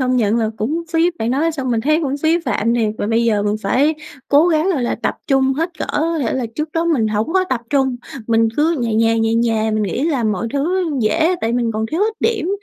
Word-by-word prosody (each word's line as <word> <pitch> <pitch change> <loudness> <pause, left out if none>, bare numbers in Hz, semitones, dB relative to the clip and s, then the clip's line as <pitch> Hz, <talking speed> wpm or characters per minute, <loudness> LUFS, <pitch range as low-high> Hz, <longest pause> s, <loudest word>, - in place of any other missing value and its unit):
công 255 0 +1
nhận 220 -1 +2
là 220 -2 0
cũng 300 +11 -2
phí. 335 +2 +3
Bạn 225 +2 -1
nói 315 +5 +1
xong 270 -4 -3
mình 230 -2 +1
thấy 305 +5 +2
cũng 280 -1 -1
phí 320 +2 +3
phạm 230 -2 0
thiệt, 225 -3 +1
và - - -1
bây 230 +1 +1
giờ 210 -3 +2
mình 210 +1 0
phải 290 +5 +2 0.3
cố 300 +5 +5
gắng, 320 +3 +2
gọi 280 -7 -1
là, 240 - 0
tập - - 0
trung 270 -1 +2
hết 330 +4 -1
cỡ. - - -2
Có 325 +2 0
thể 245 -6 -1
là 260 -3 -1
trước 305 0 -3
đó 330 0 0
mình 280 -10 +1
hổng 215 +8 -1
có 375 0 +3
tập 250 -3 0
trung, 265 -3 +1 0.3
mình 225 -1 +3
cứ 320 +3 +2
nhè 230 -2 -1
nhè, 225 +1 +2
nhè 225 0 +1
nhè; 225 -1 +1
mình 215 0 0
nghĩ 210 - -2
là 275 -8 0
mọi 220 +2 -1
thứ 340 +5 0
dễ, 320 +11 +2
tại 225 - -1
mình 235 -1 0
còn 220 +1 -2
thiếu 325 - -1
ít 435 +1 +1
điểm. 430 -6 0
260 Hz, 260 wpm, -18 LUFS, 225-320 Hz, 0.3 s, cố